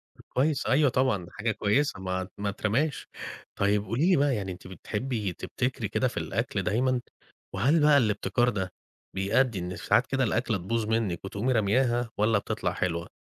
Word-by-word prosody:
طب - - -17
كويس، 140 +1 +1
أيوة 145 +1 +4
طبعًا 125 -8 +1
دي 85 - -15
حاجة 110 +1 -1
كويسة، 105 +2 +1
ما 95 0 -3
ما 100 0 -2
اترماش. 115 +9 -1 0.5
طيّب 100 0 +2
قولي 135 - +1
لي 185 - +6
بقى 140 -2 +3
يعني، 95 -2 -3
أنتِ 90 0 -10
بتحبي 105 +2 -3
تبتكري - - -3
كده - - +1
في - - -6
الأكل - - -2
دايمًا؟ 125 +5 +1 0.5
وهل 140 - +3
بقى 150 -1 +6
الابتكار 120 +1 +2
ده 95 -4 -3 0.4
بيأدّي 100 +3 +2
إن 90 +1 -4
ساعات - - +2
كده 135 -1 0
الأكلة 115 -1 0
تبوظ 110 +5 -2
منِّك 110 -6 -1
وتقومي 105 +6 -1
رمياها 120 +2 +2
والّا 105 0 +3
بتطلع - - -2
حلوة؟ 85 -1 -2
110 Hz, 170 wpm, -28 LUFS, 100-130 Hz, 0.5 s, لي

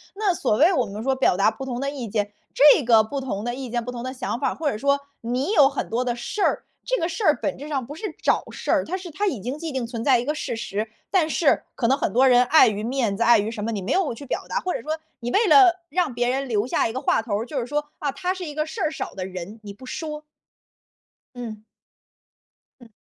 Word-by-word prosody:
那 405 -3 +1
所 245 -9 0
谓 330 - +5
我 260 -8 +2
们 205 +1 -7
说 265 0 +1
表 255 -8 +2
达 200 +2 +4
不 270 - -7
同 245 -2 -4
的 275 +1 -1
意 270 -5 -5
见， 205 -1 -1 0.2
这 290 0 +7
个 225 -2 +5
不 275 +5 -4
同 215 -6 -4
的 240 0 -2
意 265 -2 -6
见、 240 0 -2
不 250 - -4
同 240 -1 -6
的 255 - -4
想 250 -2 -3
法 - - +1
儿， - - -5
或 310 -2 -1
者 210 - -4
说 280 +3 +2 0.2
你 250 - -1
有 280 -7 +6
很 275 - -4
多 240 +3 0
的 245 - -1
事 325 - -5
儿， - - +1 0.2
这 - - 0
个 330 - 0
事 360 +6 -4
儿 305 -6 +4
本 290 - -2
质 290 +3 -8
上 270 -5 -2
不 290 +5 -8
是 405 0 -5
找 - - +2
事 - - -7
儿， - - +3
它 370 - -3
是 370 -2 -8
它 410 +6 -1
已 265 - -1
经 250 +8 -4
既 320 -1 -5
定 255 -3 -2
存 230 -1 -5
在 260 -4 +4
一 240 - -3
个 300 +2 -1
事 260 -6 -3
实， 215 -1 -3 0.2
但 340 -5 +2
是 310 -1 +2
可 235 - 0
能 270 - +3
很 - - -1
多 260 +3 +4
人 245 0 +6
碍 305 +2 +6
于 210 0 -2
面 235 -4 0
子、 230 - 0
碍 235 -1 +6
于 210 +2 -1
什 220 -2 -5
么， 230 - -2
你 205 -3 -3
没 205 +9 -1
有 370 -9 +1
去 255 +5 -10
表 - - -3
达， - - 0
或 365 - -2
者 - - -3
说 310 +1 -3 0.2
你 240 +1 -3
为 435 +1 +3
了 380 -3 +7 0.2
让 350 -7 0
别 245 +1 0
人 270 +1 -1
留 215 +1 +1
下 230 - +1
一 - - -4
个 260 - -2
话 270 - +2
头 210 -2 -2
儿， 225 - -3
就 270 +1 -3
是 - - -4
说， 295 +3 -2
啊， 285 -2 -1
他 365 +5 -2
是 370 -1 -7
一 300 - -6
个 305 +1 -1
事 385 +6 -6
儿 315 - +1
少 - - -5
的 185 -1 -5
人， 190 +4 -8
你 205 - -7
不 230 +6 -13
说。 300 +2 -5 1.1
嗯。 220 -3 -7 1.2
嗯。 235 - -14
260 Hz, 300 characters per minute, -24 LUFS, 230-300 Hz, 1.2 s, 这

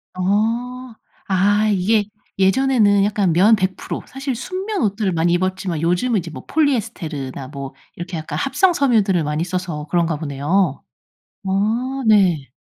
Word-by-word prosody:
어. 230 +6 -1 0.4
아 205 +3 +3
이게 205 +2 +2 0.3
예전에는 205 -1 +3
약간 200 -4 +1
면 200 +7 +5
100% 190 -2 -3
사실 270 -1 -4
순면 380 - -4
옷들을 205 -1 0
많이 170 0 +1
입었지만 185 -2 -1
요즘은 180 +7 +1
이제 170 -1 -7
뭐 - - -10
폴리에스테르나 185 - -2
뭐 140 -2 -7 0.2
이렇게 175 +1 -6
약간 155 -1 -5
합성 290 - +2
섬유들을 215 - +2
많이 150 +2 -1
써서 175 -4 -4
그런가 170 -1 +1
보네요. 150 +2 0 0.7
아 230 +8 -1
네. 185 - +3
195 Hz, 290 characters per minute, -20 LUFS, 170-230 Hz, 0.7 s, 면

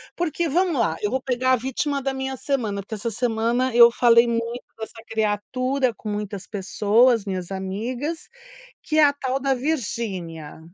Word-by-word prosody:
porque 345 0 -1
vamos 340 -1 +1
lá, 165 -8 +1
eu 210 - 0
vou 260 - 0
pegar 255 0 +1
a - - +6
vítima 265 +3 -2
da 270 0 -2
minha 265 0 -4
semana, 225 -8 -2
porque 205 - -10
essa 220 +2 -3
semana 235 +2 0
eu 235 0 +9
falei 235 0 +5
muito 235 +1 -2
dessa 225 0 -9
criatura 250 +5 0
com - - -10
muitas 205 -2 -4
pessoas, 215 +3 +2
minhas 185 -3 -4
amigas, 230 - -4 0.5
que 310 - -2
é 310 - +7
a 285 - +3
tal 265 -1 -2
da 275 0 +1
Virginia. 205 - -4
235 Hz, 170 wpm, -23 LUFS, 210-265 Hz, 0.5 s, eu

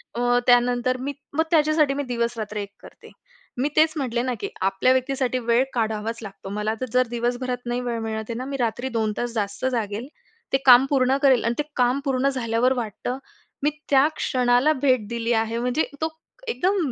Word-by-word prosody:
अ, 245 0 +2
त्यानंतर 245 +1 +3
मी 280 +3 -3 0.2
मग 320 - +4
त्याच्यासाठी 305 -2 +3
मी 285 +1 -2
दिवस-रात्र 235 -4 -3
एक 200 -1 -4
करते. - - -15 0.5
मी 270 +4 +1
तेच 315 0 +4
म्हटले 245 -4 -1
ना 255 0 -1
की - - -4
आपल्या 195 +6 +2
व्यक्तीसाठी 260 -1 0
वेळ 235 +2 +4
काढावाच 220 -1 -1
लागतो. 195 -2 -9
मला 210 +2 -1
तर - - 0
जर 255 0 +3
दिवसभरात 245 +1 -2
नाही 240 +1 -2
वेळ 240 -2 -3
मिळत 220 0 -3
आहे - - -2
ना 255 - -4
मी 275 0 -4
रात्री 245 +1 -1
2 220 -3 -1
तास 240 -1 -3
जास्त 205 +1 -3
जागेल. 225 0 -3 0.5
ते - - +6
काम 250 0 +8
पूर्ण 265 -1 +3
करेल 265 -4 +4
आणि 230 - +1
ते - - +2
काम 250 +2 +2
पूर्ण 270 0 +1
झाल्यावर 250 -1 +1
वाटतं. 245 +1 -4 0.5
मी 295 - +4 0.2
त्या 275 +1 +5
क्षणाला 250 +3 +2
भेट 255 -6 +2
दिली 235 +1 -1
आहे. 225 0 0
म्हणजे 250 +6 +1 0.2
तो 320 - +1 0.4
एकदम 400 -4 +1
245 Hz, 190 wpm, -23 LUFS, 230-265 Hz, 0.5 s, काम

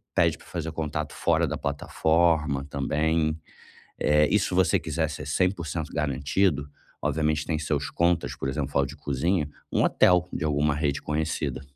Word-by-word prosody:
pede - - +3
pra - - -18
fazer 80 -2 -4
contato 80 -2 -3
fora - - +1
da - - -3
plataforma 75 0 +1
também. 80 +3 0 0.6
Eh, 75 0 +4
e 105 - +4
se 95 - -1
você 95 -1 +3
quiser 80 0 -1
ser 75 - -6
100% 85 -1 -1
garantido, 75 +2 0 0.4
obviamente 75 -1 0
tem 80 -2 -1
seus 75 -2 -2
contas, 85 0 +1
por 65 - -4
exemplo, 70 -1 0
de 75 +4 -10
cozinha, 75 +3 0 0.2
um - - +2
hotel 90 -1 +4
de 85 - -3
alguma 75 0 +1
rede 75 -2 -1
conhecida, 75 -3 -2
75 Hz, 155 wpm, -26 LUFS, 70-80 Hz, 0.6 s, Eh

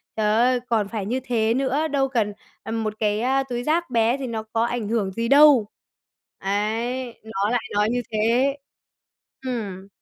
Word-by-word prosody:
"Trời 215 -1 +1
ơi, 250 +2 +3
còn 220 -4 +1
phải 210 -2 -4
như 245 +6 -1
thế 230 -3 +1
nữa, 270 +4 0
đâu 280 -3 +1
cần, 220 -5 0 0.3
ừm, 225 0 -3
một 215 -1 -2
cái, 210 0 +1
a, 265 +2 +2
túi 245 -2 -4
rác 335 +5 0
bé 235 +1 +2
thì 270 -2 -4
nó 225 -2 -4
có 225 +1 -1
ảnh 235 -3 -2
hưởng 215 -4 0
gì 230 +4 -2
đâu." 280 -4 +6 0.7
Ấy, 225 +5 -2
nó 210 -2 -2
lại 245 -1 +1
nói 210 +1 +2
như 245 +1 0
thế. 235 +6 +2 0.9
Ừm. 200 -7 -4
230 Hz, 180 wpm, -23 LUFS, 215-255 Hz, 0.9 s, đâu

